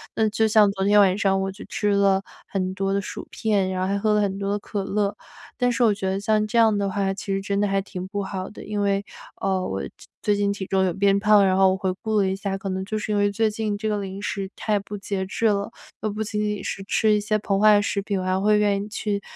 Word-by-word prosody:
那 220 - +2
就 220 +1 +1
像 210 -2 +5
昨 195 0 -2
天 205 +1 +5
晚 190 -2 +4
上 195 -2 +2
我 195 0 -2
就 200 - -11
吃 210 -1 -1
了 200 -1 +3 0.3
很 185 -1 -2
多 195 0 -1
的 200 - +1
薯 - - -7
片， 200 -4 0
然 185 0 -2
后 185 - 0
还 200 +1 0
喝 215 +1 +2
了 210 - +3
很 195 -1 -1
多 200 0 -2
的 205 - +1
可 200 -1 -4
乐， 200 0 -1 0.4
但 245 -1 +2
是 240 0 +1
我 215 -3 +5
觉 195 -1 -3
得 190 +1 -1
像 215 +1 +1
这 235 - -1
样 220 -2 +5
的 200 -1 0
话， 195 0 -1
其 195 - -8
实 195 - -1
真 200 0 -1
的 205 - +2
还 195 0 +1
挺 185 -1 -7
不 200 +1 -3
好 190 -1 -5
的。 - - -11
因 210 0 -3
为， 200 0 0 0.4
呃， 190 -1 0
我 95 -6 -3
这 70 - -6 0.3
最 210 - +2
近 200 0 +1
体 200 -1 -5
重 190 -1 +2
有 180 - 0
变 200 +1 +3
胖， 210 -1 +5
然 190 -1 +3
后 190 -1 +5
我 190 - -1
回 185 -1 -1
顾 220 -1 0
了 195 - +2
一 190 - -1
下， 195 0 -3
可 195 - -7
能 190 0 -2
就 215 +2 -3
是 210 - -4
因 - - +1
为 205 0 +2
最 220 +2 +1
近 210 -1 -2
这 215 +1 -3
个 210 -1 0
零 195 0 -6
食 195 -2 -3
太 215 -2 0
不 205 +1 -7
节 195 -1 -3
制 215 +4 -3
了， 200 -1 0 0.3
又 215 - -1
不 210 - -5
仅 210 0 -3
仅 210 -2 -2
是 195 - -4
吃 215 +1 +3
一 210 - +3
些 215 +1 0
膨 200 -1 0
化 210 0 +6
食 205 0 -1
品， 200 -1 -2
我 185 - -3
还 185 0 +1
会 210 +1 +3
愿 200 -1 +1
意 - - -7
去 205 -1 -2
200 Hz, 310 characters per minute, -24 LUFS, 195-210 Hz, 0.4 s, 化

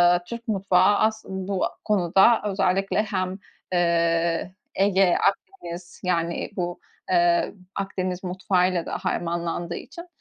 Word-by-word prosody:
ııı, 175 - -2
Türk 235 +3 -8
mutfağı 195 -1 +3
as 220 0 +1
bu 190 0 -2 0.2
konuda 195 +2 +4
özellikle 195 +1 +1
hem, 190 -2 -3 0.3
eee, 170 0 +1 0.2
Ege, 190 -2 +3
Akdeniz, 175 -4 -9
yani, 170 -2 -1
bu, 175 -2 -3 0.3
eee, 175 -1 +3 0.2
Akdeniz 185 -2 -3
mutfağıyla 180 -1 0
da - - -3
harmanlandığı 170 0 -2
için, 340 +6 -9
185 Hz, 110 wpm, -24 LUFS, 175-195 Hz, 0.3 s, konuda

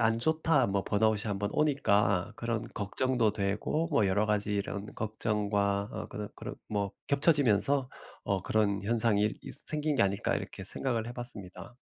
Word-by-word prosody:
안 115 0 +3
좋다 160 0 +3
뭐 100 0 0
번아웃이 110 0 +2
1 100 -2 -1
번 100 +1 -2
오니까 105 -11 +2
그런 115 -1 -3
걱정도 115 +2 +1
되고 105 +10 -1
뭐 105 - +3
'여러 105 +3 +2
가지 105 -1 0
이런 100 0 -3
걱정과 105 -2 -1
어 110 -1 -5
그런 105 -1 -6
그런 - - -7
뭐 100 -2 -1 0.2
겹쳐지면서 140 - +3 0.4
어 95 -2 -1
그런 100 -1 +1
현상 115 0 +2
일 105 +1 +2
있 - - -4
생긴 150 +1 0
게 135 - +3
아닐까.' 100 0 +1
이렇게 - - -5
생각을 115 -4 -1
해 120 - -5
봤습니다. 120 -1 -5
110 Hz, 325 characters per minute, -30 LUFS, 100-120 Hz, 0.4 s, 안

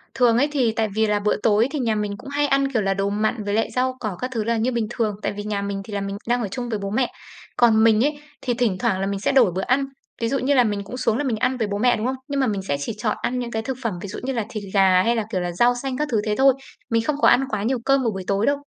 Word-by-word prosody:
Thường 240 -2 +4
ấy, 285 - +3
thì 255 -6 +2
tại 220 -1 +1
vì 220 0 +2
là 210 0 +1
bữa 210 +1 +1
tối 220 +2 +4
thì 300 - -2
nhà 230 -4 +1
mình 210 -1 -2
cũng 275 - -10
hay 290 +1 +1
ăn, 275 0 +2
kiểu 225 -5 +1
là, 195 0 +1
đồ 195 +1 -1
mặn 215 +1 -1
với 205 0 -2
lại 225 +1 0
rau 255 0 0
cỏ 210 -6 -4
các 255 +1 -3
thứ 220 -2 -1
là 230 +1 0
như 235 +3 +1
bình 230 -3 -1
thường, 215 -4 -1
tại - - 0
vì 205 0 -6
nhà 205 -1 -2
mình 200 0 -3
thì 210 - -9
là 200 - -1
mình 195 0 -4
đang 245 +1 +1
ở 220 - -1
chung 245 +1 -4
với 220 -3 -2
bố 200 0 -4
mẹ. 245 +4 0 0.5
Còn 225 -2 +5
mình 225 +1 +5
ấy, 290 0 0 0.2
thì 245 - -1
thỉnh 230 -6 0
thoảng 190 0 +1
là 195 - -1
mình 200 0 -2
sẽ 205 - +1
đổi 250 -8 +5
bữa 185 +2 -2
ăn. 265 +6 +1 0.4
Ví 230 - +1
dụ 275 +1 0
như 275 +3 +1
là 250 - +5
mình 205 -3 -1
cũng 225 +5 -8
xuống 230 -3 +1
là 290 - -1
mình 245 -6 -1
ăn 255 +3 0
với 225 -3 -1
bố 200 0 -2
mẹ, 245 +2 +3
đúng 220 - -3
không? 260 +1 0
Nhưng 280 -1 -2
mà 265 - +2
mình 200 -3 -1
sẽ 145 -7 -2
chỉ 145 +10 -3
chọn 210 0 -1
ăn 250 +1 -1
những 240 -1 -4
cái 220 -1 -2
thực 260 +2 -4
phẩm 225 -5 -1
ví 200 - -6
dụ 195 - -6
như 265 +1 -2
là 230 -3 -2
thịt 215 -3 -5
gà 190 -2 +5
hay 235 +3 +2
là, 225 - 0
kiểu 185 - -1
là, 175 0 -2
rau 240 +8 +3
xanh 265 -2 -3
các 300 - -1
thứ 215 -2 +2
thế 210 -1 0
thôi. 270 0 +6 0.4
Mình 230 0 +2
không 300 +3 0
có - - +6
ăn 250 +3 +5
quá 210 -2 -2
nhiều 250 +3 0
cơm 275 0 +3
vào 230 - +1
buổi 190 -1 -5
tối 200 +2 +1
đâu. 285 0 +2
225 Hz, 340 wpm, -22 LUFS, 205-255 Hz, 0.5 s, thôi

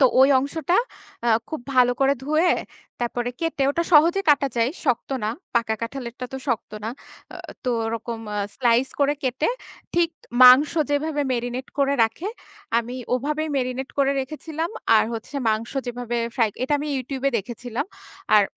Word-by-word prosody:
তো - - +7 0.2
ওই 270 - +7
অংশটা 310 +6 0 0.5
আ - - +3 0.2
খুব 315 - -4
ভালো 245 -1 +5
করে 275 0 +4
ধুয়ে 310 +5 +2 0.5
তারপরে 240 0 -1
কেটে 330 -4 -1
ওটা 335 +4 0
সহজে 335 +6 +6
কাটা 280 -1 +3
যায়। 230 +3 +2
শক্ত 250 -4 0 0.2
না। 215 - +1 0.2
পাকা 230 -2 +2
কাঁঠালেরটা 250 0 -5
তো - - -3
শক্ত 235 -3 -1
না। - - -2 0.5
আ - - -7 0.3
তো 250 - +1 0.2
ওরকম 230 0 -4 0.2
আ - - 0 0.2
স্লাইস 245 0 +2
করে 285 +1 +3
কেটে 260 +3 0 0.5
ঠিক 340 -1 +3 0.3
মাংস 255 +4 +8 0.2
যেভাবে 290 0 0
মেরিনেট 245 +2 -3
করে 280 0 +3
রাখে 225 - -1 0.5
আমি 235 +2 -4 0.2
ওভাবেই 300 +5 -1
মেরিনেট 255 0 -2
করে 275 0 +3
রেখেছিলাম। 315 +5 -4 0.3
আর - - +4
হচ্ছে 230 +5 -7
মাংস 220 +3 -1
যেভাবে 240 -1 -3 0.2
ফ্রাই, 230 -4 +3
এটা 265 - -1
আমি 295 +1 -4
YouTube 265 +1 -5
এ - - -2
দেখেছিলাম। 240 - -5 0.5
আর 210 - +7
260 Hz, 160 wpm, -23 LUFS, 240-290 Hz, 0.5 s, মাংস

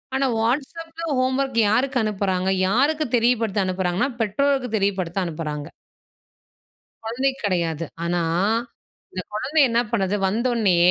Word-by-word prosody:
ஆனா 270 - +2
Whatsappல 325 +7 -2
ஹோம்வொர்க் 260 -1 0
யாருக்கு 255 +4 +1
அனுப்புறாங்க? 190 -3 0 0.2
யாருக்கு 290 +9 +2
தெரியப்படுத்த 225 -4 +1
அனுப்புறாங்கன்னா, 185 +4 0
பெற்றோருக்கு 260 +4 +1
தெரியப்படுத்த 195 -2 -1
அனுப்புறாங்க. 155 -3 -4 1.4
கொழந்தைக்கு 265 +4 -1
கிடையாது. 170 -4 -1 0.2
ஆனா, 175 0 0 0.9
இந்த 185 - -4
கொழந்தை 270 +8 +1
என்னா 235 0 +2
பண்ணுது? 195 -2 +1
வந்தவுனே, 225 -3 +1
225 Hz, 105 wpm, -23 LUFS, 185-265 Hz, 1.4 s, ஆனா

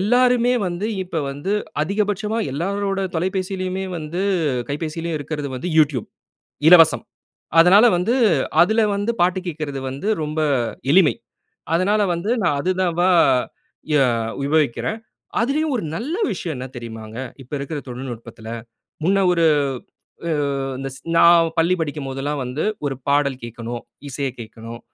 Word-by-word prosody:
எல்லாருமே 245 +3 +3
வந்து 175 +4 -2 0.2
இப்ப 180 -3 -3
வந்து 145 +8 -3 0.3
அதிகபட்சமா 210 +4 -1
எல்லாரோட 195 +6 -1 0.2
தொலைபேசிலயுமே 185 +1 -2
வந்து 165 +4 -4 0.5
கைபேசிலயும் 160 +2 -3
இருக்கிறது 145 -1 -4
வந்து 175 +8 -4
Youtube. 140 -7 +2 0.6
இலவசம். 165 -2 +7 0.6
அதனால 195 +7 +7
வந்து 205 +8 +1 0.5
அதில 220 +5 +2
வந்து 205 +3 0
பாட்டு 180 +1 +2
கேட்கிறது 150 -4 -4
வந்து 135 +10 -5 0.2
ரொம்ப 155 +1 -3 0.5
எளிமை. 175 -1 +5 0.6
அதனால 200 +5 +2
வந்து 170 +6 -3
நான் 150 -5 +2
அது 180 - 0
தான் 175 -2 0
வ - - +4 0.9
எ - - +5 0.5
உபயோகிக்கிறேன். 150 - 0 0.4
அதிலேயும் 290 +6 0
ஒரு 230 - -3
நல்ல 260 - -3 0.2
விஷயம் 175 -4 -4
என்ன 130 +1 -5
தெரியுமாங்க? 110 -1 -8 0.2
இப்ப 125 - -20
இருக்கிற 140 +2 -4
தொழில்நுட்பத்தில, 120 -3 -8 0.6
முன்ன 195 +3 +3
ஒரு 170 -2 +3 0.8
அ - - 0 0.5
இந்த 135 0 -4
ஸ் - - -13 0.2
நான் 170 -1 +6
பள்ளி 170 +3 +4
படிக்கும் 150 -2 -3
போதுலாம் 140 +2 -3
வந்து 125 +5 -3 0.2
ஒரு 135 - -1
பாடல் 140 -2 +2
கேட்கணும், 120 0 -6 0.3
இசைய 140 0 -2
கேட்கணும், 115 +1 -9
165 Hz, 130 wpm, -21 LUFS, 140-190 Hz, 0.9 s, இலவசம்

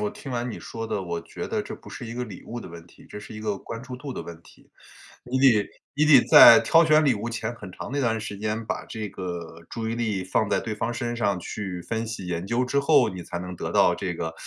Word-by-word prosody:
我 210 -1 -1
听 205 -10 -9
完 125 0 -2
你 - - -7
说 115 0 -6
的， 100 - -2
我 85 -2 -3
觉 - - -7
得 - - -1
这 - - -7
不 - - -14
是 - - -8
一 115 - -6
个 125 +1 -3
礼 105 -7 -8
物 120 +1 -7
的 - - -9
问 85 0 -11
题， - - -19
这 - - -8
是 105 - -10
一 110 - -7
个 105 -2 -2
关 115 +4 -8
注 125 -1 -8
度 140 0 -7
的 - - -5
问 85 -1 -9
题。 - - -20 0.6
你 125 +2 -2
得 125 -6 +4 0.2
你 150 +2 +2
得 145 -5 +8
在 115 - +10
挑 165 0 +5
选 155 0 +5
礼 140 -4 +4
物 110 +2 -4
前 115 0 -3
很 100 -4 -10
长 - - -7
那 145 - -1
段 115 -4 +1
时 105 -2 -6
间 110 +2 -3
把 - - -4
这 110 -3 -5
个 85 -3 -7
注 110 -1 -4
意 115 - -2
力 105 -5 -1
放 100 +3 0
在 - - +2
对 110 - -4
方 115 +3 -2
身 120 0 -3
上 100 -4 +1
去 90 0 -5
分 115 +4 -3
析 110 -4 -6
研 90 +1 -3
究 120 +3 +1
之 125 +3 +1
后， 140 -5 +4
你 90 -2 -7
才 85 - -6
能 90 +1 -6
得 - - -4
到 - - +5
这 95 -3 -3
个 80 0 -4
110 Hz, 295 characters per minute, -25 LUFS, 95-125 Hz, 0.6 s, 在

